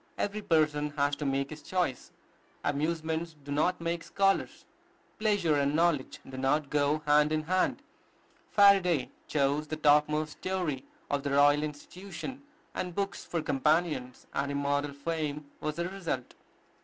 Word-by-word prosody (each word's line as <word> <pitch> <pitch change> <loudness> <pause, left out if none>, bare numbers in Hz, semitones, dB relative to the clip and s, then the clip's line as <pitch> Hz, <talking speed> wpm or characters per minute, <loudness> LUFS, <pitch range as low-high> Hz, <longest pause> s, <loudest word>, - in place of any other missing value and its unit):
Every 205 +1 -2
person 150 -4 +2
has 145 0 +2
to 145 - -2
make 135 +1 -1
his 155 0 -8
choice. 180 -9 -2 0.5
Amusements 160 +2 -1
do 145 - -8
not 155 +5 +1
make 170 0 -2
scholars: 195 0 0 0.5
pleasure 205 -7 +2
and 140 0 +2
knowledge 165 -5 +1
do 130 - -8
not 135 +2 +1
go 150 +1 +1
hand 150 +1 +4
in 155 0 0
hand. 185 +4 0 0.7
Faraday 190 -8 +5 0.2
chose 145 +1 +1
the 155 - -3
topmost 150 0 +3
story 175 -8 -2 0.3
of 145 -1 +1
the 140 - -2
Royal 145 +1 +5
Institution, 180 - -7 0.3
and 180 -2 -4
books 200 0 -2
for 165 -3 -3
companions, 150 -3 0
and 140 0 -1
immortal 140 0 0
fame 150 0 -3
was 155 -1 -3
the 170 +1 -2
result. 175 -10 -4
150 Hz, 145 wpm, -30 LUFS, 145-170 Hz, 0.7 s, Faraday